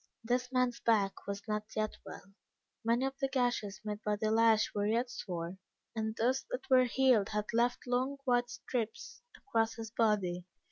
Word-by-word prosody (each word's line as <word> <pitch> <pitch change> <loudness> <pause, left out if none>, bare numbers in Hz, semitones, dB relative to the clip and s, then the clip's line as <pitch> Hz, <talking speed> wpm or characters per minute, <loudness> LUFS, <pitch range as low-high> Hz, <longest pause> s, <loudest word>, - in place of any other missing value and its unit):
This 250 +2 0
man's 250 -2 +1
back 205 -4 +1
was 200 +2 -5
not 210 0 -3
yet 215 0 -1
well. 195 - -11 0.5
Many 235 +3 +2
of 270 0 -4
the 270 - +1
gashes 245 -7 0
made 210 0 -4
by 210 0 +1
the 215 +1 -1
lash 225 -1 +4
were 205 0 0
yet 235 +3 +1
sore, 175 -3 -5 0.4
and 220 0 -2
those 250 +4 +1
that - - -4
were 255 -1 +7
healed 245 -4 +3
had 210 -1 -1
left 240 +2 +1
long 255 +3 0
white 245 -1 +2
stripes 230 -3 -4 0.2
across 225 - 0
his 225 -1 -7
body. 195 -6 +1
225 Hz, 175 wpm, -33 LUFS, 210-245 Hz, 0.5 s, were